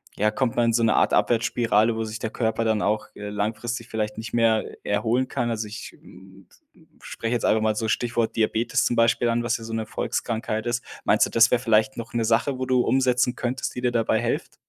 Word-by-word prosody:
ja, 105 +1 +1
kommt 120 +2 -1
man 120 - +2
in 115 - +2
so 115 0 +2
'ne 110 - +3
Art - - +2
Abwärtsspirale, 115 -1 +2
wo 110 - -2
sich 110 0 -6
der 110 - -3
Körper 110 0 -1
dann 110 -1 +1
auch, 105 +1 0
äh, 105 0 -6
langfristig 110 +3 -3
vielleicht 105 -1 -3
nicht 110 +1 -7
mehr 115 -2 +2 0.2
erholen 120 +5 0
kann. 120 -3 -1
Also 110 -1 -3
ich, 105 +1 -9
hm, 95 0 -16 0.3
hm, - - -24
spreche 115 +1 -4
jetzt 120 - -1
einfach 110 0 +3
mal 110 -1 +1
so 110 +1 -2
Stichwort 120 0 -1
Diabetes 115 +1 +1
zum 120 - +1
Beispiel 115 +1 +3
an, 120 0 0
was 120 0 0
ja 115 - -10
so 115 - -6
'ne 110 -1 -2
Volkskrankheit 110 0 -3
ist. 120 0 -1 0.2
Meinst - - +4
du, - - -6
das 115 0 +4
wäre 125 0 +2
vielleicht 110 +1 +2
noch 115 0 -7
'ne 115 -1 0
Sache, 120 +4 +1
wo 130 - -1
du 130 -1 +2
umsetzen 125 0 +2
könntest, 125 +1 -3
die 125 - -4
dir 125 -1 +1
dabei 115 -1 +1
hilft? 120 - -3
115 Hz, 235 wpm, -24 LUFS, 110-120 Hz, 0.3 s, Meinst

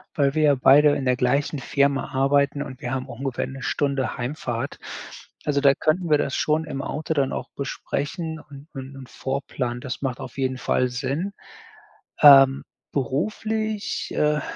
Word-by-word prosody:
weil 140 -4 +2
wir 155 - +2
ja 145 -2 +5
beide 145 +3 +6
in 135 - -3
der 125 - +3
gleichen 140 +4 0
Firma 140 +1 +1
arbeiten 140 +1 +2
und 130 -1 -10
wir 125 - -4
haben 130 0 -3
auch 120 -2 -10
ungefähr 135 -2 -2
'ne 135 0 -8
Stunde 140 0 -1
Heimfahrt. 125 0 -4 0.7
Also 145 -1 +1
da 140 -1 +6
könnten 165 +5 0
wir 150 - +5
das 135 - -1
schon 155 +1 +1
im 135 -3 -4
Auto 155 +3 -3
dann 140 -3 0
auch - - -5
besprechen 160 +3 -4
und 145 0 -13
und 135 0 -8
und 130 -2 -11
vorplanen. 130 -2 -3
Das 130 - -5
macht 130 -3 -2
auf 130 - -9
jeden 130 -1 -1
Fall 125 0 +1
Sinn. 140 +10 -3 0.9
Ähm, 135 -2 +8 0.3
beruflich, 215 - -2
äh, 150 0 +2
140 Hz, 170 wpm, -24 LUFS, 130-150 Hz, 0.9 s, Ähm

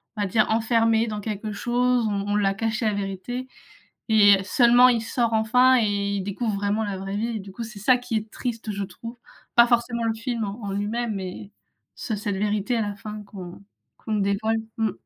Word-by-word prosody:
on 210 - -3
va 200 - 0
dire 215 +3 +3
«enfermé 225 0 +2
dans 210 -1 -4
quelque 210 0 -4
chose». 240 +2 +1
On 200 0 -2
on - - +1
l'a 195 -1 +2
caché 225 +2 -2
la 215 - +2
vérité 200 +6 -4 0.6
et 205 -3 +6
seulement, 245 +4 +5
il 235 -2 +2
sort 230 0 0
enfin 250 +4 +4
et 200 -2 0
il 195 - -2
découvre 205 +2 -2
vraiment 205 +2 0
la 200 -2 -3
vraie 195 +1 -5
vie 230 +2 -2
et - - -5
du 195 0 -10
coup, 230 +5 -6
c'est 220 -2 -9
ça 250 +5 +4
qui 245 -1 -5
est 215 0 -2
triste, 230 -3 -4
je 200 0 -3
trouve. 230 +5 -9 0.4
Pas 235 0 +7
forcément 235 -1 +1
le 225 - +1
film 230 0 -3
en 205 +3 -7
en 200 - -3
lui-même 215 +3 -2
mais 190 +1 -6 0.4
sur 215 -3 -4
cette 200 -1 -3
vérité 210 +3 0
à 230 - +1
la 205 -1 -3
fin 210 +1 -8
qu'on 185 -3 -10 0.4
qu'on 220 - -3
dévoile. 205 +2 0 0.2
Mmh. 220 -3 +1
215 Hz, 210 wpm, -24 LUFS, 200-235 Hz, 0.6 s, Pas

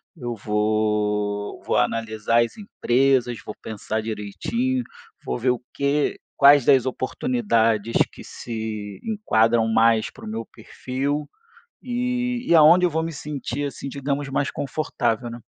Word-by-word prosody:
eu 120 -6 -5
vou 105 -1 -1
vou - - 0
analisar 115 +1 +1
as 115 - -6
empresas. 130 - +1
Vou 105 - -7
pensar 110 0 -4
direitinho, 115 - -2 0.4
vou - - -2
ver 125 +1 +2
o 125 - -2
que 140 +1 0 0.2
quais 140 -2 +7
das 130 -2 +5
oportunidades 115 - 0 0.2
que - - -12
se 110 -3 -6
enquadram 115 - +2
mais 110 0 +3
para - - -13
o - - -7
meu 110 +1 -4
perfil 135 +6 -4 0.5
e 245 0 -2
e - - +4
aonde 170 +3 +7
eu - - 0
vou 160 +1 0
me 165 0 -3
sentir 145 -2 -4
assim, 140 0 -6
digamos, 140 +1 -3
mais 140 +1 0
confortável, 120 -5 -2
né. 120 +1 -8
125 Hz, 140 wpm, -23 LUFS, 110-150 Hz, 0.5 s, quais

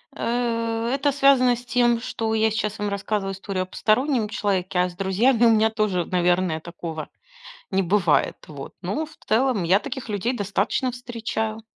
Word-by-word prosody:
Э, 230 -1 -1
это 280 +1 +1
связано 270 -3 +4
с 240 - -10
тем, 240 -1 +2
что 225 -2 -3
я 220 0 +3
сейчас 210 0 -2
вам 205 0 -1
рассказываю 200 0 -2
историю 195 -1 -3
о - - -7
постороннем 230 +5 +1
человеке, 190 -5 -1
а 180 0 +2
с 175 - -13
друзьями 225 +6 +2
у 230 - +6
меня 220 0 +4
тоже, 215 -5 0
наверное, 175 -2 +1
такого 165 -2 -7 0.6
не 190 0 +2
бывает. 175 -4 +2
Вот, 140 -3 -9
но 290 - -2
в 310 - -17
целом 230 -2 +2
я 185 +4 +4
таких 265 0 -6
людей 215 +4 -1
достаточно 205 +5 -1
встречаю. 225 -2 -4
215 Hz, 170 wpm, -23 LUFS, 190-240 Hz, 0.6 s, у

